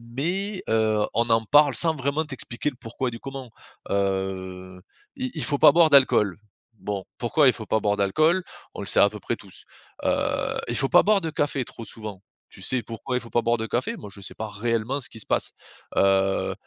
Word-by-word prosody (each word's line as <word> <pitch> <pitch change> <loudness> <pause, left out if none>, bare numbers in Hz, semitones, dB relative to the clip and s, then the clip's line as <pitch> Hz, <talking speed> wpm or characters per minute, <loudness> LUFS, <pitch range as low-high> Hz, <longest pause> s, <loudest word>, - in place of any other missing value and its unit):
mais, 190 +7 -2
heu, 110 -1 +2
on 115 0 +1
en 115 0 +3
parle 145 +2 +5
sans 165 -2 +7
vraiment 140 +3 -1
t'expliquer 135 -1 -2
le 130 - -14
pourquoi 120 +3 -4
du 115 -1 -8
comment. 135 -3 -8 0.4
Heu, 95 -2 -3 0.4
i 255 -1 -3
il 150 - -3
faut 145 +2 0
pas 145 - +7
boire 165 0 +5
d'alcool. 130 -9 +4 0.4
Bon. 100 -2 -5 0.2
Pourquoi 135 +4 +3
il 125 - +5
faut 110 - -8
pas 110 - +1
boire 105 0 0
d'alcool? 155 - +2 0.3
On - - -7
le 100 - -6
sait - - +4
à 100 - +6
peu 105 0 -9
près 120 - -3
tous. 100 -4 -12 0.4
Heu, - - +3 0.6
il 120 - -2
faut 135 +2 +1
pas 175 - +6
boire 205 -2 +3
de 165 - -2
café 145 -3 -1
trop 115 - -10
souvent. 105 -3 -8 0.3
Tu - - -15
sais 130 -2 +1
pourquoi 115 +2 -5
il 125 - 0
faut 115 - -12
pas 120 - +1
boire 115 +1 +1
de 110 - -3
café? 120 +3 -2
Moi 105 - -10
je 100 - -9
sais 95 - -9
pas 110 -1 -5
réellement 115 +5 -2
ce 125 - 0
qui 110 - -5
se - - -3
passe. - - 0 0.4
Heu 95 0 +2
115 Hz, 220 wpm, -24 LUFS, 105-140 Hz, 0.6 s, sans